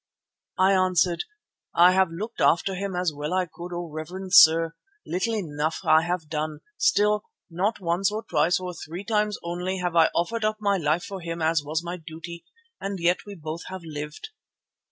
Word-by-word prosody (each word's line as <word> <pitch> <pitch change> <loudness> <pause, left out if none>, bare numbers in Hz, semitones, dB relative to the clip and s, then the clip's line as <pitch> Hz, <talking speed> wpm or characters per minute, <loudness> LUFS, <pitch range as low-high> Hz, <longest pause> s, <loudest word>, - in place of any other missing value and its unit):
"I 190 +1 +4
answered: 180 -2 +2 0.5
'I 175 +2 +7
have 190 -1 +3
looked 210 +8 -6
after 190 +3 +3
him 195 0 -3
as 180 -3 0
well 150 +4 -3
as 185 - +2
I 180 - -10
could, 175 +1 -8
O 175 0 -4
reverend 180 +5 -6
sir. 165 -3 +7 0.3
Little 225 +6 -1
enough 155 -5 -2
have 155 0 +5 0.2
I - - -26
done; 155 0 -3
still, 210 0 +2 0.3
not 195 +7 0
once 180 +2 +1
or 215 +1 -3
twice 165 -2 +2
or 180 -1 -5
three 170 +3 -7
times 210 -1 0
only 180 +2 -3
have 180 -2 -2
I 165 -1 +6
offered 220 +7 0
up 215 0 +1
my 200 -2 +2
life 160 0 0
for 195 -4 -7
him 170 0 -5
as 160 -1 +2
was 155 +3 -2
my 175 +1 -4
duty, 165 +1 -9 0.4
and 195 0 -4
yet 175 +4 +1
we 205 - -7
both 160 0 -6
have 190 -2 -7
lived. 150 - -7
175 Hz, 190 wpm, -25 LUFS, 160-195 Hz, 0.5 s, I